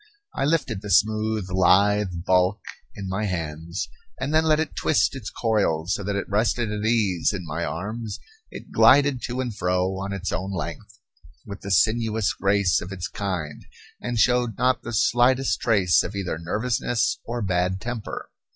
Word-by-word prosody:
I -, -, -1 dB
lifted 140 Hz, -10 st, 0 dB
the 105 Hz, -, -7 dB
smooth, 110 Hz, +1 st, +2 dB
lithe 95 Hz, -1 st, +3 dB
bulk 95 Hz, +3 st, +3 dB, 0.4 s
in 100 Hz, -, -6 dB
my 95 Hz, +3 st, -2 dB
hands, 85 Hz, -1 st, -4 dB, 0.3 s
and 135 Hz, +4 st, -2 dB
then 160 Hz, 0 st, +4 dB
let 155 Hz, -1 st, +3 dB
it 160 Hz, -, -2 dB
twist 150 Hz, -, +2 dB
its 125 Hz, -6 st, -6 dB
coils 90 Hz, -7 st, 0 dB
so 100 Hz, -, -3 dB
that 100 Hz, +1 st, -2 dB
it 100 Hz, -, -2 dB
rested 110 Hz, +2 st, 0 dB
at 105 Hz, 0 st, -3 dB
ease 105 Hz, -8 st, +1 dB
in 95 Hz, -3 st, -5 dB
my 80 Hz, +2 st, -3 dB
arms; 105 Hz, +6 st, -4 dB, 0.3 s
it -, -, -10 dB
glided 140 Hz, -3 st, +5 dB
to 125 Hz, +2 st, -3 dB
and 120 Hz, -5 st, -4 dB
fro, 90 Hz, 0 st, 0 dB
on 100 Hz, 0 st, -4 dB
its 95 Hz, -1 st, -3 dB
own 95 Hz, +1 st, -3 dB
length, 95 Hz, +3 st, -6 dB, 0.5 s
with 100 Hz, 0 st, -8 dB
the 100 Hz, -, -7 dB
sinuous 110 Hz, +2 st, +2 dB
grace 95 Hz, -3 st, +2 dB
of 90 Hz, -, -7 dB
its 90 Hz, -3 st, -4 dB
kind, 90 Hz, -7 st, -4 dB, 0.4 s
and 120 Hz, -1 st, -3 dB
showed 120 Hz, -1 st, +2 dB
not 130 Hz, 0 st, +2 dB
the 120 Hz, -, -6 dB
slightest 120 Hz, -2 st, +3 dB
trace 95 Hz, -6 st, +3 dB
of 100 Hz, -, -5 dB
either 90 Hz, -5 st, -3 dB
nervousness 115 Hz, +6 st, -1 dB
or 120 Hz, 0 st, -4 dB
bad 90 Hz, 0 st, 0 dB
temper. 120 Hz, 0 st, -6 dB
100 Hz, 170 wpm, -24 LUFS, 90-115 Hz, 0.5 s, glided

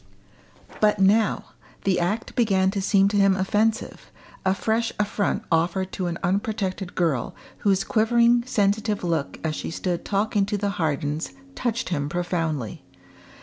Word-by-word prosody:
But 210 Hz, -1 st, +3 dB
now 205 Hz, +2 st, +2 dB, 0.3 s
the 190 Hz, -2 st, +2 dB
act 200 Hz, +6 st, -2 dB
began 195 Hz, -5 st, +3 dB
to 200 Hz, -1 st, -2 dB
seem 195 Hz, 0 st, +4 dB
to 205 Hz, -, 0 dB
him 195 Hz, -1 st, +5 dB
offensive, 210 Hz, +3 st, 0 dB, 0.3 s
a 190 Hz, 0 st, +2 dB
fresh 225 Hz, +3 st, 0 dB
affront 205 Hz, 0 st, 0 dB
offered 175 Hz, +3 st, +1 dB
to 185 Hz, -, -3 dB
an 170 Hz, -1 st, -3 dB
unprotected 195 Hz, 0 st, -1 dB
girl, 155 Hz, -9 st, 0 dB, 0.2 s
whose 195 Hz, -2 st, +2 dB
quivering 235 Hz, +2 st, +3 dB
sensitive 210 Hz, -2 st, +1 dB
look 165 Hz, -5 st, -1 dB
as 155 Hz, -1 st, -1 dB
she -, -, -4 dB
stood 175 Hz, +1 st, -2 dB
talking 200 Hz, 0 st, 0 dB
to 205 Hz, -, -1 dB
the 200 Hz, 0 st, -1 dB
Hardens 150 Hz, -, -1 dB, 0.2 s
touched 235 Hz, -3 st, -2 dB
him 145 Hz, -5 st, -1 dB
profoundly. 165 Hz, -, -2 dB
195 Hz, 145 wpm, -24 LUFS, 175-215 Hz, 0.3 s, him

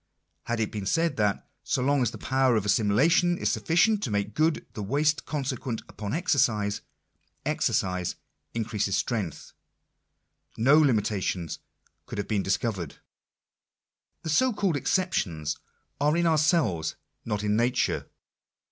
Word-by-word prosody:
Had 120 Hz, 0 st, -1 dB
it 110 Hz, -, -1 dB
been 100 Hz, -3 st, -4 dB
said 165 Hz, +3 st, +1 dB
that 105 Hz, -2 st, 0 dB
— -, -, -50 dB
so 125 Hz, -, 0 dB
long 140 Hz, +1 st, +2 dB
as 120 Hz, -, +2 dB
the -, -, -9 dB
power 130 Hz, -1 st, +2 dB
of 105 Hz, -2 st, 0 dB
assimilation 130 Hz, -, +3 dB
is -, -, 0 dB
sufficient 195 Hz, +6 st, +2 dB
to 135 Hz, -, -2 dB
make 100 Hz, 0 st, -1 dB
good 155 Hz, +4 st, +1 dB
the 110 Hz, -, -5 dB
waste 145 Hz, +9 st, +1 dB
consequent 130 Hz, -5 st, -3 dB
upon 105 Hz, -1 st, -6 dB
exercise, 115 Hz, -, +1 dB, 0.6 s
exercise 90 Hz, -1 st, 0 dB, 0.4 s
increases 110 Hz, -3 st, -1 dB
strength 95 Hz, -11 st, -3 dB, 0.5 s
— -, -, -38 dB
no 150 Hz, +3 st, +8 dB
limi 125 Hz, -8 st, +4 dB
tations 95 Hz, -5 st, -2 dB, 0.5 s
could -, -, -7 dB
have 100 Hz, -, -2 dB
been 105 Hz, -3 st, +1 dB
discovered. 95 Hz, -5 st, -2 dB, 1.3 s
The 160 Hz, -, -4 dB
so 255 Hz, +9 st, +3 dB
called 195 Hz, -5 st, 0 dB
exceptions 95 Hz, -, 0 dB, 0.4 s
are 150 Hz, +3 st, +2 dB
in 170 Hz, -, +2 dB
ourselves, 155 Hz, -, +2 dB, 0.3 s
not 105 Hz, -2 st, -2 dB
in 105 Hz, 0 st, +1 dB
nature. 120 Hz, +3 st, +1 dB
120 Hz, 140 wpm, -27 LUFS, 105-155 Hz, 1.3 s, no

